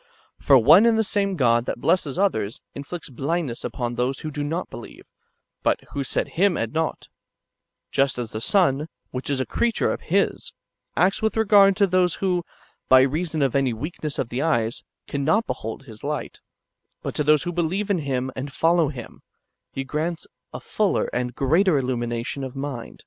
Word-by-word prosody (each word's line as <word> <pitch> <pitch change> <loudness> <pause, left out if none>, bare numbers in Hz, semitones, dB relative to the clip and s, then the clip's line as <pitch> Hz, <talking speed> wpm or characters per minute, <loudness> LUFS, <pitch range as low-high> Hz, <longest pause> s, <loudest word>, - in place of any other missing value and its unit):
* - - -39
For 140 - +8
one 155 - +7
and 230 -1 +4
the 220 - +3
same 200 -2 0
God 120 -5 +2
[that - - -3
blesses 165 -1 +1
others] 115 - 0
inflicts 145 +4 -7
blindness 140 0 -2
upon 120 -2 -3
those 125 +3 -1
who 155 - -5
do 145 0 -3
not 165 +5 -2
believe, - - -11 0.6
but - - +2
who 140 -2 -2
set 130 - -1
Him 190 0 +2
at 115 - -2
naught; 160 0 -2 0.8
just 135 -1 +1
as 120 -3 -4
the 110 - -5
sun, 150 - +2 0.2
which 130 +2 -5
is 140 -2 0
a 130 - 0
creature 235 -1 0
of - - -6
His, - - 0 0.4
[acts 190 +2 +3
with 220 0 0
regard] 200 -3 +6
to 200 - +4
those 185 -2 +2
who, 180 -3 0 0.5
b}^ 130 0 +6
reason 160 -1 -1
of 135 -2 0
any 135 -3 +2
weakness 150 +4 -5
of 115 - -2
the 125 +3 -2
eyes, 120 -8 0 0.2
cannot 155 +11 +1
behold 110 +5 -5
his 110 -5 -13
light; 150 +1 -4 0.6
but - - -3
to 150 - 0
those 150 -1 +4
who 175 - -3
believe 180 +5 -1
in 185 - +2
Him 130 -3 -2
and 140 +2 -5
follow 165 +2 +3
Him, 130 -5 -8 0.5
He 135 - -4
grants 155 +5 -3 0.3
a - - -6
fuller - - 0
and 125 -1 -2
greater 165 +5 +3
illumination 120 0 -2
of 130 0 -6
mind. 135 -4 -6
145 Hz, 185 wpm, -23 LUFS, 130-175 Hz, 0.8 s, For